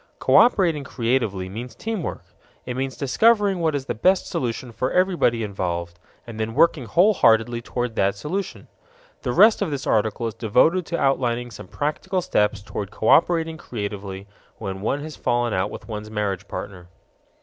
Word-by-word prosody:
Cooperating 175 - +4
creatively 115 -7 -1
means 115 +5 -7
teamwork. 220 -7 -4 0.4
It 125 - -4
means 130 0 -3
discovering 205 - +3
what 160 -3 +1
is 135 -2 -3
the - - -2
best 185 - +2
solution 120 0 -3
for 130 +3 -2
everybody 175 -11 +2
involved, 85 -4 -4 0.3
and 115 -2 -9
then 110 +1 -3
working 155 -3 +3
wholeheartedly 120 - +3
toward 120 -1 -3
that 100 +1 +2
solution. 180 - -5 0.5
The - - -2
rest 215 0 +5
of 200 - 0
this 140 -2 -4
article 110 +2 0
is 115 - -2
devoted 160 - +2
to 170 - -2
outlining 120 -3 0
some 95 - -10
practical 175 - -2
steps 105 -5 0
toward 100 -1 -5
cooperating 165 +8 +2
creatively 100 -6 -6 0.3
when 95 0 -5
one 135 +7 -1
has 155 0 -7
fallen 120 -2 0
out 95 +2 0
with - - -9
one's 105 -1 -6
marriage 100 -2 -3
partner. 90 -3 -7
120 Hz, 160 wpm, -23 LUFS, 105-160 Hz, 0.5 s, rest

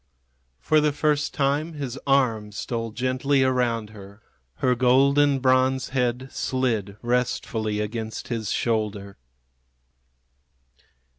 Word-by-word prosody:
For 155 -1 +3
the 150 0 +2
first 150 0 0
time 145 +4 0
his 135 -3 -5
arm 115 -6 +2
stole 115 +2 -4
gently 130 +3 +1
around 120 -4 0
her. 100 0 -13 0.3
Her 130 -1 +1
golden 135 +3 +4
bronze 130 0 +2
head 125 0 -1
slid 115 -6 -2
restfully 115 -3 -1
against 110 +1 -4
his 115 -4 -3
shoulder. 105 - -2
125 Hz, 100 wpm, -24 LUFS, 110-135 Hz, 0.3 s, golden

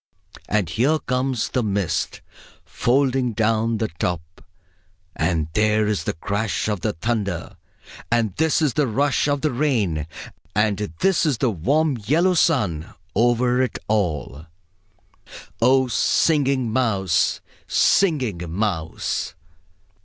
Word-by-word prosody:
And 105 -4 +1
there 125 - +2
comes 125 -3 -1
the 125 - 0
mist, 100 -5 -1 0.4
folding 130 -1 +1
down 115 +1 +1
the 110 0 -1
top; 85 -1 -3 0.7
and 80 -1 0
there 105 +1 +2
is 105 -6 -1
the - - -1
crash 100 +7 -2
of 105 -4 -2
the - - -1
thunder; 100 -1 -3 0.6
and 115 -5 +1
this 160 0 +2
is 145 -5 +2
the 150 -3 +1
rush 140 +6 +1
of 145 -1 0
the 155 - +1
rain; 110 - 0 0.5
and 105 -1 +2 0.2
this 190 -3 +3
is 150 -7 +1
the 130 -2 +1
warm 135 - +1
yellow 170 - +3
sun 105 - +1 0.2
over 120 +3 +2
it 130 -4 -1
all 80 -7 -2 1.1
O, 130 +2 +4
Singing 130 -1 +1
Mouse, 100 -9 +1 0.3
Singing 130 - +2
Mouse!... 85 -4 -2
115 Hz, 120 wpm, -22 LUFS, 100-135 Hz, 1.1 s, O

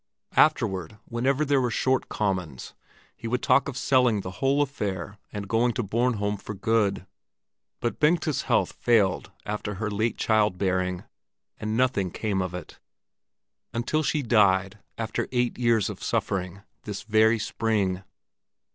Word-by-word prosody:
Afterward, 95 +1 +2
whenever 130 +5 0
there 140 -2 +3
were 125 - +1
short 130 +3 0
commons, 90 -10 -2 0.4
he 115 - -7
would 125 +2 -1
talk 140 - +4
of 130 - -6
selling 125 -6 +3
the 90 -1 -6
whole 140 +2 +3
affair 105 -8 -4
and 105 -1 -5
going 115 +3 +2
to 120 - -2
Bornholm 105 -1 0
for 105 - -6
good. 100 -2 +1 0.8
But 120 - -2
Bengta's 155 -1 +2
health - - +1
failed 105 -6 +1
after 105 0 -3
her 105 +2 -3
late 110 +3 0
child 105 -4 +2
bearing, 95 -1 0 0.6
and 110 +1 -2
nothing 120 -7 +1
came 100 +1 -1
of 90 -1 -3
it, 90 - -9 1.0
until 120 +7 0
she 150 -1 0
died 100 -3 +3 0.2
after 110 -1 -2
eight 125 -1 0
years 115 -4 +3
of - - -7
suffering, 95 0 -2 0.2
this 105 -2 -6
very 110 +1 +4
spring. 105 -4 -1
110 Hz, 145 wpm, -26 LUFS, 100-120 Hz, 1.0 s, talk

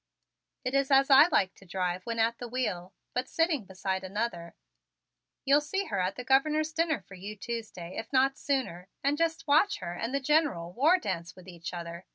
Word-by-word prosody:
It 255 - -1
is 275 0 +2
as 275 0 +4
I 275 +4 +9
like 195 - +2
to - - -18
drive 180 0 -3
when 230 -1 -2
at 230 +1 +1
the 245 - -5
wheel, 205 -8 -3 0.2
but 250 +1 -2
sitting 325 - +1
beside 190 0 -3
another 190 -3 -4 0.9
"You'll 280 +2 +5
see 385 +7 -2
her 200 - -2
at 185 +2 0
the 250 - -6
Governor's 305 +5 +2
dinner 320 -6 +1
for - - -13
you 200 +3 -7
Tuesday, 215 -5 -6
if 225 - -6
not 270 0 +3
sooner, 255 -13 -2 0.2
and 280 +1 +2
just 330 +1 -1
watch 310 +8 +4
her 175 -2 -5
and 230 +7 -3
the 275 - 0
General 275 - +1
war 310 - +4
dance 185 - -4
with 185 0 -15
each 170 -2 -7
other. 170 0 -7
235 Hz, 200 wpm, -29 LUFS, 185-280 Hz, 0.9 s, I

